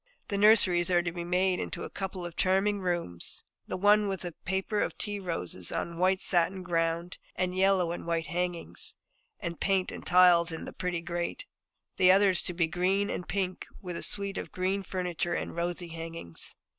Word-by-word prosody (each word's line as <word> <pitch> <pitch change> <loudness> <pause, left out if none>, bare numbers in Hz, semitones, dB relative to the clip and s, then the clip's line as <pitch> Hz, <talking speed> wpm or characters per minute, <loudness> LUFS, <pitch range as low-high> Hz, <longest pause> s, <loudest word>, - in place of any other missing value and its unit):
The 200 - -1
nurseries 195 -5 +5
are 175 -1 +3
to 170 - -2
be 170 0 -5
made 180 +1 +1
into - - -4
a - - -5
couple 190 -2 -5
of 175 - -7
charming 195 +2 +2
rooms, 175 - -2 0.2
the - - -3
one 205 +2 +5
with 190 -2 -3
a 175 - -3
paper 190 +5 -2
of - - -2
tea 205 -1 -3
roses 95 - -2
on - - -2
a - - -9
white 185 +2 +2
satin 185 +1 +2
ground, 170 0 -1 0.2
and 185 0 -1
yellow 190 -2 +3
and 170 - -6
white 165 -1 0
hangings, 175 +2 -3 0.4
and 170 -4 -5
paint 195 -2 +1
and - - -8
tiles 180 -2 +5
in 160 - -5
the - - -8
pretty 180 -2 -2
grate. 175 - -3 0.5
The 185 -1 +7
other 195 +1 +5
is 180 - +2
to 180 - -2
be 170 -1 +3
green 185 +5 0
and 180 - -4
pink, 185 -2 -2
with 180 -2 -6
a - - -4
suite 200 -1 +2
of - - -7
green 190 +2 -1
furniture 175 -2 -2
and - - -4
rosy 175 0 -2
hangings. 165 - -7
180 Hz, 195 wpm, -29 LUFS, 170-190 Hz, 0.5 s, The